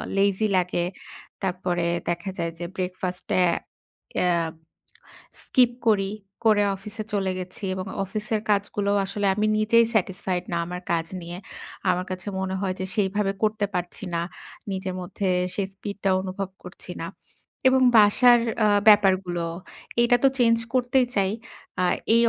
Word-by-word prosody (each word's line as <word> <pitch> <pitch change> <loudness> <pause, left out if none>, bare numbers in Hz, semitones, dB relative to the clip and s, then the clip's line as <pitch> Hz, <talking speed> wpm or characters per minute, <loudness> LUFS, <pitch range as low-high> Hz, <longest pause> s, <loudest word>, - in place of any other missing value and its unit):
Lazy 200 +2 +2
লাগে। 175 -1 +1 0.6
তারপরে 180 -2 -1 0.2
দেখা 175 +2 -2
যায় 165 0 -1
যে 175 - -3
ব্রেকফাস্ট 180 0 -4
এ - - +6 0.8
এ - - +2 1.2
স্কিপ 250 -2 +4 0.2
করি, 195 -2 +3 0.3
করে 210 -2 +5
অফিসে 210 +3 -7
চলে 195 -2 +1
গেছি। 185 +2 -8
এবং 185 0 -4 0.2
অফিসের 210 +2 -2
কাজগুলো 200 0 +1
আসলে 200 +1 -3
আমি 210 +1 +1
নিজেই 230 +2 +4
স্যাটিসফাইড 185 -3 0
না - - +1
আমার 180 +1 -6
কাজ 165 -1 +1 0.2
নিয়ে। 170 +1 -7 0.5
আমার 180 0 +1
কাছে 185 +1 -6
মনে 190 0 -2
হয় 190 -2 0
যে 190 - -2
সেইভাবে 200 -1 +1
করতে 215 -1 +2
পারছি 180 +4 -4
না। 170 - +1 0.5
নিজের 190 -1 -3
মধ্যে 185 +2 -2 0.3
সেই 200 -2 -1
স্পিডটা 200 0 -3
অনুভব 190 0 -4
করছি - - -9
না। - - -3 0.6
এবং 260 0 +4 0.2
বাসার 240 +4 +7 0.3
আ - - +5 0.2
ব্যাপারগুলো, 190 -4 +4 0.6
এটা 245 +1 +5
তো 270 - +8
চেঞ্জ 230 -1 +5 0.2
করতেই 250 0 +3
চাই। 195 -1 +2 0.5
আ - - +2 0.3
এই 235 - +6
195 Hz, 145 wpm, -25 LUFS, 185-210 Hz, 1.2 s, তো